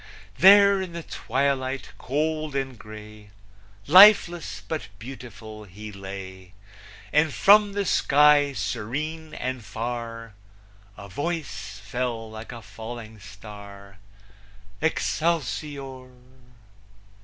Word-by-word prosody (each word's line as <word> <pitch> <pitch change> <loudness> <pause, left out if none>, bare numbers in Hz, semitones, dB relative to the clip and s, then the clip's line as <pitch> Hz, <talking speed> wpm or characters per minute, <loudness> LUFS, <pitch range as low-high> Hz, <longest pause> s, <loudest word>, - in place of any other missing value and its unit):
There 200 0 +7
in 185 -2 -6
the 170 -1 -6
twilight 135 0 -2
cold 155 +2 -2
and 135 -2 -2
gray, 105 -1 -12 0.6
Lifeless, 180 0 +6
but 155 -11 -4
beautiful, 110 -3 -10
he 105 +3 -10
lay, 95 -2 -9 0.6
And 150 0 +3
from 205 +5 +5
the 200 0 -1
sky 145 -3 +4
serene 155 +8 -4
and 130 -2 -4
far, 115 +1 -6 0.6
A 100 - -10
voice 145 - -5
fell, 115 0 -3
like 110 +2 -9
a 120 -2 -9
falling 110 +2 -9
star, 100 -1 -12 0.8
Excelsior! 145 -5 -2
130 Hz, 95 wpm, -25 LUFS, 110-155 Hz, 0.8 s, There